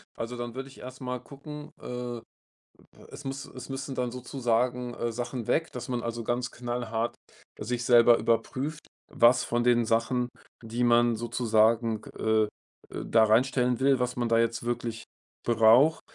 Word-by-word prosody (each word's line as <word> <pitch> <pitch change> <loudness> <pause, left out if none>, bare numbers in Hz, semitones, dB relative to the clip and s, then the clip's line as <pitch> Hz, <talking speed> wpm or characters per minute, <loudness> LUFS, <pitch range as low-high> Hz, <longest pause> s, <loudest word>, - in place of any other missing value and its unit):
Also, 120 +2 -5
dann 120 -1 -5
würde 135 +2 -6
ich - - -16
erst 130 +2 -10
mal 125 -1 -3
gucken, 150 +3 -10
äh, 125 -1 -5 0.9
es 145 - -10
müss 135 +1 -4
es 130 - -10
müssen 135 0 -5
dann 125 -1 -1
sozusagen, 125 -1 -1
äh, 120 -1 -2
Sachen 120 0 -4
weg, 160 +1 +1
dass 125 -1 -6
man 125 -2 -2
also 115 -1 -4
ganz 120 +1 -1
knallhart 120 -1 -3 0.5
sich 120 +2 -2
selber 120 -1 +6
überprüft, 130 +7 -1 0.2
was 120 +2 +4
von 120 0 0
den 120 -1 +3
Sachen, 115 +2 +1 0.3
die 115 +2 -3
man 120 0 +4
sozusagen, 115 -1 +1 0.2
äh, 110 0 +2
äh, 105 - 0 0.6
da 110 -1 +4
reinstellen 125 +2 +2
will, 135 -1 +3
was 125 0 -1
man 120 -1 0
da 115 0 +3
jetzt 115 0 -1
wirklich 120 -1 -3 0.4
braucht. 120 +7 +5
120 Hz, 160 wpm, -28 LUFS, 115-125 Hz, 0.9 s, selber